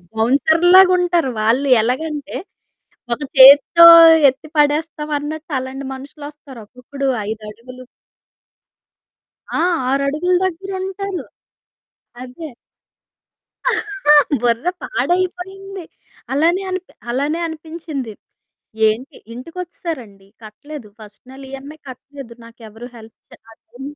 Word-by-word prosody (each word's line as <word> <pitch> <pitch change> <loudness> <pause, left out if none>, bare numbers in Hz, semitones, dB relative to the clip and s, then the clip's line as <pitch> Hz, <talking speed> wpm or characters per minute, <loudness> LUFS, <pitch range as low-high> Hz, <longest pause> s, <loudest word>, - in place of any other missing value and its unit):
బౌన్సర్లులాగుంటారు, 345 +6 +3
వాళ్ళు 245 +6 +1
ఎలాగంటే, 290 +4 -4 0.8
ఒక - - -15 0.2
చేత్తో 285 +5 +8 0.4
ఎత్తి 270 +4 -4
పడేస్తాం 300 +1 0
అన్నట్టు 310 +2 -8
అలాంటి 260 +1 -7
మనుషులొస్తారు. 285 -2 -12
ఒక్కొక్కడు 270 +3 -6 0.2
ఐదడుగులు 225 +4 -9 1.7
ఆ! - - 0 0.3
ఆరడుగుల 290 +6 0
దగ్గరుంటారు. 380 +1 -5 1.0
అదే. 260 +5 -9 1.9
బుర్ర 240 +7 0
పాడైపోయింది. 370 -1 -3 0.5
అలానే 335 +7 +1
అనిపి 370 0 -6 0.2
అలానే 290 +7 -2
అనిపించింది. 315 -6 -7 0.8
ఏంటి, 235 +6 -4 0.2
ఇంటికొచ్చేసారండి. 260 - -8 0.2
కట్టలేదు 235 +3 -11
ఫస్ట్ 210 -1 -15
నెల 270 +1 -12
ఈఎంఐ 280 +3 -10
కట్టలేదు. 265 -2 -12
నాకెవరు 230 +1 -13
హెల్ప్ 225 0 -15
చె - - -16 0.2
అది 240 +3 -17
285 Hz, 85 wpm, -18 LUFS, 250-335 Hz, 1.9 s, చేత్తో